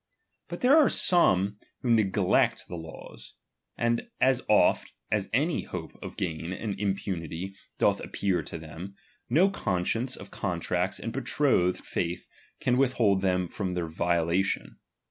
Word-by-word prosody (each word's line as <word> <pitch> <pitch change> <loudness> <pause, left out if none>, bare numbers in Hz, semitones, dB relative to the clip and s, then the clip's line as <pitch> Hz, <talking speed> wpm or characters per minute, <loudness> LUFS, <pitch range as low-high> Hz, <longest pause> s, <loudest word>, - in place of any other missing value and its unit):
But - - -7
tljere 270 +4 +6
are 305 - +6
some 105 - +3 0.2
who 125 - 0
neglect 110 -4 +2
the 90 - -6
laws; 80 -1 -10 0.4
and 120 - 0
as 130 -1 +3
oft 105 - +3 0.2
as 105 -2 0
any 150 +8 +1
hope 85 -3 -6
of - - -8
gain 85 0 -3
and 100 +2 -3
impunity 95 -2 -3 0.2
doth - - +3
appear 95 -4 -1
to 80 - -7
tliemj 80 +5 -9 0.3
no 175 +10 +4
conscience 115 - -1
of - - -11
contracts - - -1
and - - -5
betrothed 90 +1 +1
faith 85 0 -3 0.3
can 125 0 +1
withhold 115 -7 +3
them 90 -1 +1
from 90 +1 -3
their 90 -1 -1
violation. 85 +3 0
95 Hz, 140 wpm, -28 LUFS, 90-120 Hz, 0.4 s, tljere